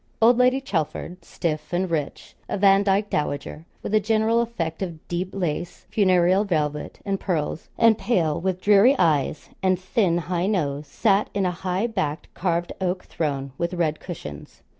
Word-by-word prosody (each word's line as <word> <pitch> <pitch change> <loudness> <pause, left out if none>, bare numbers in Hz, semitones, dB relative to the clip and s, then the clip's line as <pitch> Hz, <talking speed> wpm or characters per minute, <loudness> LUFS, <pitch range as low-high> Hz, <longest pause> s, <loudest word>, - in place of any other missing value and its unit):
Old 235 +2 +5
Lady 255 +1 +4
Chelford, 180 - -3
stiff 155 -3 -3
and 180 +2 0
rich, 150 -4 -3 0.2
a - - -1
Vandyke 200 +1 +3
dowager, 150 +1 -3 0.2
with - - -4
a 215 - +6
general 220 +2 +2
effect 170 -9 -3
of 170 -4 -6
deep 175 +1 -2
lace, 175 -3 -3
funereal 185 -1 +4
velvet, 150 -6 -2
and 195 -1 -1
pearls; 160 -3 -2
and 225 -1 +5
pale, 170 -10 +1
with 185 0 -1
dreary 210 +7 +6
eyes, 150 -2 +1
and 185 -1 +2
thin 185 -2 +1
high 175 +2 -1
nose, 150 -8 -1
sat 205 -2 +2
in 200 -2 +1
a 180 - +1
high 185 +3 -2
backed 185 -10 -3
carved 175 -1 -1
oak 185 0 -1
throne, 140 -4 -3
with 170 +1 -1
red 160 -3 0
cushions. 75 - -9
180 Hz, 160 wpm, -24 LUFS, 160-200 Hz, 0.2 s, a